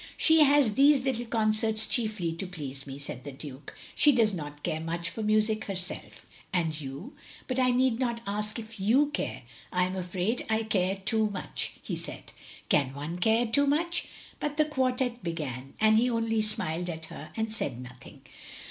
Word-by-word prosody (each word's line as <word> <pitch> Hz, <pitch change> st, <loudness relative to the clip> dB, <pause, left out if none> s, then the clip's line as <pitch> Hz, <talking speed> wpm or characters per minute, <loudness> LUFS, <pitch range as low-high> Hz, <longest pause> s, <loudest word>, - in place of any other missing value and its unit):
" -, -, -14 dB
" -, -, -20 dB
She 320 Hz, -1 st, +7 dB
has 280 Hz, -6 st, +4 dB
these 275 Hz, +2 st, +5 dB
little 240 Hz, -3 st, -1 dB
concerts 220 Hz, -1 st, +1 dB
chiefly 215 Hz, -8 st, 0 dB
to 185 Hz, +3 st, -5 dB
please 140 Hz, -6 st, -6 dB
me," 135 Hz, 0 st, -6 dB
said 140 Hz, -3 st, -6 dB
the 145 Hz, -, -6 dB
Duke, 140 Hz, 0 st, -9 dB, 0.2 s
"she 295 Hz, -, +6 dB
does 225 Hz, -5 st, +3 dB
not 145 Hz, -4 st, -7 dB
care 155 Hz, -, -1 dB
much 170 Hz, +2 st, -2 dB
for 220 Hz, -, -5 dB
music 215 Hz, 0 st, +2 dB
herself." 185 Hz, -2 st, -4 dB
'* -, -, -20 dB
And 160 Hz, -4 st, 0 dB
you 135 Hz, 0 st, -7 dB, 0.2 s
— -, -, -19 dB
^but 255 Hz, 0 st, -1 dB
I 255 Hz, -1 st, +4 dB
need 250 Hz, -1 st, +2 dB
not 240 Hz, -3 st, 0 dB
ask 210 Hz, +2 st, -2 dB
if 220 Hz, -1 st, -8 dB
you 260 Hz, +9 st, +3 dB
care -, -, -3 dB
— -, -, -17 dB
" -, -, -18 dB
" -, -, -29 dB
I 180 Hz, -, +2 dB
am 185 Hz, +1 st, -1 dB
afraid 185 Hz, +5 st, -1 dB
I 220 Hz, 0 st, +1 dB
care 195 Hz, -3 st, +1 dB
too 215 Hz, +2 st, 0 dB
much, 200 Hz, -2 st, -3 dB
" -, -, -28 dB
he -, -, -3 dB
said. -, -, -7 dB, 0.4 s
"Can 135 Hz, -2 st, +2 dB
one 155 Hz, +5 st, -5 dB
care 225 Hz, +5 st, +3 dB
too 285 Hz, +5 st, +3 dB
much?" 340 Hz, +5 st, +1 dB, 0.3 s
But 295 Hz, 0 st, -3 dB
the 305 Hz, -, +4 dB
quartette 255 Hz, -4 st, 0 dB
began; 135 Hz, -6 st, -5 dB
and 220 Hz, 0 st, +5 dB
he 250 Hz, +2 st, +2 dB
only 225 Hz, -2 st, +1 dB
smiled 180 Hz, -5 st, -1 dB
at 160 Hz, -1 st, -5 dB
her, 155 Hz, -, -9 dB
and 220 Hz, 0 st, -1 dB
said 135 Hz, -, -3 dB
nothing. 125 Hz, 0 st, -12 dB
215 Hz, 210 wpm, -28 LUFS, 165-235 Hz, 0.4 s, She